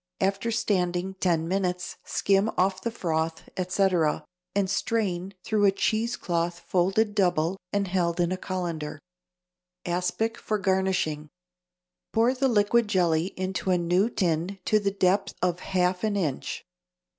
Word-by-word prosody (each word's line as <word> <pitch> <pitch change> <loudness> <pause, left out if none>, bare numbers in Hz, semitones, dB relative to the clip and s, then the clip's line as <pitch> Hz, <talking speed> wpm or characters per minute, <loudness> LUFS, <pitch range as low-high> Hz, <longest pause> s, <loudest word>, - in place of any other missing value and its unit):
After 195 +4 0
standing 190 -4 0
ten 165 -3 +1
minutes 180 -1 -1
skim 200 +2 +2
off 190 0 +2
the 235 - -1
froth, 160 -6 -2
etc., 180 -4 +1 0.3
and 200 -1 +2
strain 195 -3 -1
through 210 -2 +2
a 195 - +6
cheese 220 +4 0
cloth 170 0 -1
folded 195 +4 +1
double 180 -2 +1
and 200 -1 0
held 175 -2 0
in 175 0 +2
a - - +1
colander. 170 -5 -4 0.9
=Aspic 180 +6 -1
for 215 - -1
Garnishing.= 190 -6 0 0.8
Pour 230 +3 +4
the 265 +1 +1
liquid 225 0 +3
jelly 175 -4 +2
into 185 -1 -2
a 180 - +4
new 175 +5 +2
tin 175 -1 -1
to 215 - +4
the 200 -1 0
depth 195 0 +1
of 180 -1 0
half 180 0 0
an 215 -2 +1
inch. 160 -9 -2
185 Hz, 140 wpm, -27 LUFS, 175-200 Hz, 0.9 s, a